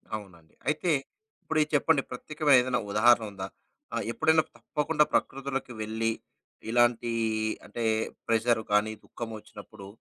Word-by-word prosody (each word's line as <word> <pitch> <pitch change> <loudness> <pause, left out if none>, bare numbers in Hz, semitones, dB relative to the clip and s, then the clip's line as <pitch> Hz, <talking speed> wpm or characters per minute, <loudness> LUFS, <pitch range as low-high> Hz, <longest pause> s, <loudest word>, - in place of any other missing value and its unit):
అవునండి. 85 -7 -11
అయితే 155 +4 +1 0.5
ఇప్పుడిది 155 -1 +1
చెప్పండి? 145 0 +4
ప్రత్యేకమైన 150 -3 +3
ఏదైనా 125 0 0
ఉదాహరణ 115 +2 +5
ఉందా? 95 -1 -6 0.5
ఆహ్, - - -1
ఎప్పుడైనా 160 +4 +3
తప్పకుండా 150 +1 +1
ప్రకృతులోకి 135 -1 -1
వెళ్లి 110 +1 -1 0.6
ఇలాంటి 120 0 +3 0.5
అంటే 115 +3 -5 0.4
ప్రెషర్ 115 0 +2
కానీ 105 +1 +3
దుఃఖం 120 -1 -7
వచ్చినప్పుడు 105 -1 -12
120 Hz, 115 wpm, -28 LUFS, 110-145 Hz, 0.6 s, ఉదాహరణ